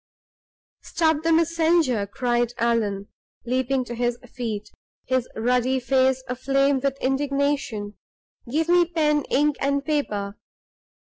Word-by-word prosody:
"Stop 315 -2 +1
the 330 +1 +1
messenger!" 325 -8 +2
cried 240 +1 -1
Allan, 215 -4 0 0.4
leaping 255 +1 0
to 240 - -6
his 240 0 -1 0.2
feet, 220 -5 -4 0.3
his 255 -1 0
ruddy 250 +3 +1
face 260 +1 +2
aflame 275 +2 +1
with 275 0 -1
indignation. 275 -6 -1 0.6
"Give 320 +4 +1
me 350 0 +5
pen, 305 -3 +1
ink, 295 +1 +1
and 280 0 0
paper! 210 -10 -2
260 Hz, 115 wpm, -24 LUFS, 240-295 Hz, 0.6 s, me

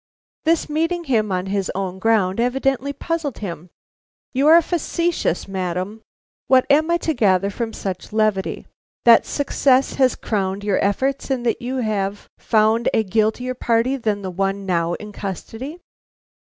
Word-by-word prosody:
This 330 0 +2
meeting 330 +3 -1
him 220 -8 +1
on 180 0 -1
his 195 0 -1
own 190 -1 -3
ground 205 -2 +2
evidently 270 +2 0
puzzled 300 -1 -3
him. 175 -3 -6 0.6
"You 275 +3 +2
are 325 +2 +9
facetious, 340 - -1
madam. 190 +2 -3 0.5
What 260 -1 +5
am 310 +3 +4
I 340 - +3
to 320 - +1
gather 200 -5 +2
from 230 +1 -3
such 190 -4 -5
levity? 215 -3 0 0.4
That 235 -1 +7
success 275 -2 +2
has 255 -1 +4
crowned 195 -2 -2
your 205 -2 +1
efforts, 265 +9 0
and 255 -3 -1
that 230 - 0
you 250 +2 -3
have 200 -1 -2
found 220 +1 +2
a 220 - +3
guiltier 220 +5 0
party 240 +1 +1
than 215 -6 -2
the 190 - -4
one 195 +2 -2
now 170 -2 0
in 210 0 -9
custody?" 225 - -6
220 Hz, 155 wpm, -21 LUFS, 195-270 Hz, 0.6 s, are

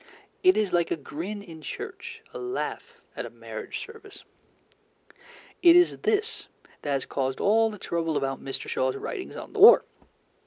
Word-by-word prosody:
It 370 -1 +5
is 210 -4 +1
like 170 -1 +2
a - - +1
grin 170 +7 -6
in 165 -5 -11
church, - - -7
a - - -6
laugh 430 +5 -5 0.2
at - - -4
a - - -9
marriage - - -7
service. 440 -3 -13 1.4
It 340 -1 +8
is 355 0 +5
this 435 +1 0 0.3
that 145 - -5
has 140 -2 0
caused 130 -1 -2
all 225 +2 +4
the 210 - -8
trouble 165 -4 -1
about 135 -1 -2
Mr. 135 - -4
Shaw's 130 0 0
writings 370 - -6
on - - -9
the 425 - -4
war. 430 +4 +9
205 Hz, 165 wpm, -27 LUFS, -, 1.4 s, war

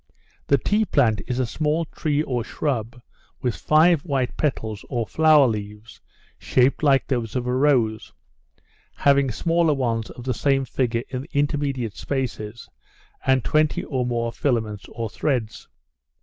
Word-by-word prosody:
The 140 - +4
tea 210 +9 +1
plant 120 - +2
is 125 - -2
a 130 - +1
small 155 +6 -1
tree 150 -1 -1
or 125 -5 -2
shrub, 120 -3 -3 0.4
with 125 -3 -1
five 155 +1 +4
white 135 -6 -1
petals, 110 -8 -2
or 120 -3 -1
flower 155 +2 +5
leaves, 105 0 -6 0.4
shaped 130 +1 +2
like 140 -3 +3
those 120 -4 -2
of 125 -1 -1
a 125 - -1
rose, 125 -6 +1 0.8
having 140 -1 +3
smaller 165 +5 +1
ones 115 -4 -1
of 120 - -10
the 130 0 -1
same 135 +4 +1
figure 120 -3 -1
in 130 -1 -4
the 145 - -12
intermediate 140 -5 -1
spaces, 120 -5 -4 0.6
and 130 -2 +3
twenty 155 0 +1
or 130 -2 -2
more 120 -1 -1
filaments 110 -7 -2
or 115 -1 -4
threads. 115 -1 -2
130 Hz, 150 wpm, -23 LUFS, 115-145 Hz, 0.8 s, flower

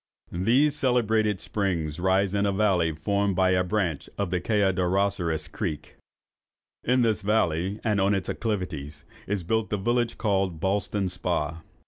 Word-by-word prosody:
These 125 +12 +2
celebrated 110 -7 +1
springs 85 -8 -2
rise 95 +1 +2
in 100 0 +1
a - - +2
valley 95 -5 +2
formed 100 +5 0
by 95 0 +3
a 90 0 +3
branch 90 -6 -2
of 100 -4 -2
the 90 -1 0
Kayaderosseras 95 -5 +1
Creek. 85 -4 -5 0.9
In 125 0 +3
this 110 -2 +1
valley, 100 -2 0
and 105 -3 +1
on 100 +1 +3
its 95 -2 -3
acclivities, 90 -10 -4 0.2
is 100 -2 -1
built 110 +5 0
the 105 - -1
village 120 +3 0
called 95 -6 0
Ballston 100 +1 0
Spa. 80 -2 -2
100 Hz, 145 wpm, -26 LUFS, 90-105 Hz, 0.9 s, by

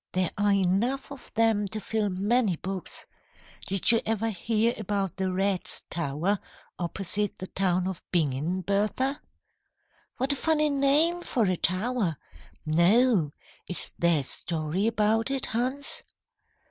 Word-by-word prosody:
There 185 -2 +1
are 205 0 +2
enough 200 +9 +1
of 280 -3 -11
them 220 -3 +2
to 215 +3 -4
fill 215 -1 -1
many 200 +2 +1
books. 190 +2 -4 0.6
Did 195 +4 +3
you 230 - +3
ever 225 +1 -1
hear 225 +4 +1
about 200 -3 -2
the 190 -1 -1
Rats' 190 -1 0
Tower 170 +5 0 0.4
opposite 195 +3 +1
the 185 - -6
town 185 -1 +1
of 190 -2 -4
Bingen, 160 +2 0
Bertha?" 210 - 0 1.0
"What 270 +2 +1
a - - -2
funny 305 +1 +2
name 290 +5 +3
for 245 -8 0
a 185 -1 +1
tower! 185 - 0 0.5
No. 175 - +4 0.4
Is 180 - -6
there 170 -3 +3
a - - -6
story 165 +7 -2
about 225 +1 +1
it, 270 -1 0
Hans?" 260 +5 -2
200 Hz, 135 wpm, -27 LUFS, 180-235 Hz, 1.0 s, No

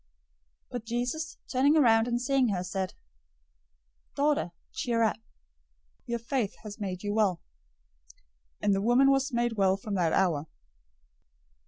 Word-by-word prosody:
009:022 - - -44 0.6
But 245 -2 -5
Jesus, 245 +7 -3
turning 280 +4 +4
around 225 -5 +5
and 240 0 0
seeing 265 0 +2
her, 190 -4 -1
said, 185 0 -3 1.2
"Daughter, 285 - +1 0.2
cheer 230 -2 0
up! 220 - +1 0.9
Your 235 0 -1
faith 235 -2 -2
has 210 0 -8
made 185 -2 -4
you 205 0 -1
well." 205 -5 +2 1.2
And 205 - +2
the 195 - +1
woman 245 +5 +5
was 275 +1 +1
made 235 -2 0
well 190 -1 +3
from 205 +1 -6
that 175 -4 +1
hour. 160 -6 +1
225 Hz, 140 wpm, -29 LUFS, 195-255 Hz, 1.2 s, around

